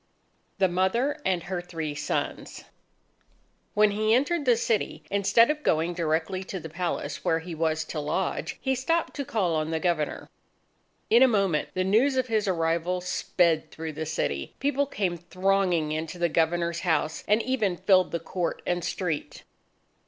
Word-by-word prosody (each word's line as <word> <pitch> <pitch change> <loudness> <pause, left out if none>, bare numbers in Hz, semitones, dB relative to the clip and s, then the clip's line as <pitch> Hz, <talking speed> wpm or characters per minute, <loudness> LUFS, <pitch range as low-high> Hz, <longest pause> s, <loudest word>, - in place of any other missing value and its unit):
The 195 -1 +4
Mother 230 - 0
and 180 -3 0
her 180 0 -3
Three 165 -4 -5
Sons 145 - -3 1.1
When 210 0 +5
he 215 +2 +2
entered 285 +4 +1
the 245 -3 +4
city, 215 -9 -1
instead 200 +5 +4
of 300 0 -4
going 165 - +1
directly 165 +2 -1
to 190 - -5
the 160 - -8
palace 155 -4 -3
where 160 - +2
he 165 +1 -6
was 160 -1 0
to 155 - -4
lodge, 150 +5 -2
he 265 - 0
stopped 330 +6 0
to 280 - -1
call 200 -9 0
on 155 0 -1
the 160 0 -1
Governor. 165 -4 -1 0.8
In 235 +2 +7
a 265 - +8
moment, 195 -9 +1
the 185 - +1
news 235 +8 +3
of 260 - +2
his 220 -4 0
arrival 170 0 0
sped 175 -2 +1
through 160 -1 -6
the 160 +1 -4
city. 70 - -2
People 285 +1 0
came 190 -8 -2
thronging 185 -2 +1
into 160 +3 -3
the 170 -1 +1
Governor's 170 +1 +1
house, 160 -2 0
and 210 +2 +4
even 215 -9 0
filled 185 -1 +4
the 170 - -1
court 170 +1 -3
and 175 -1 -1
street. 160 -5 -3
180 Hz, 165 wpm, -27 LUFS, 165-210 Hz, 1.1 s, a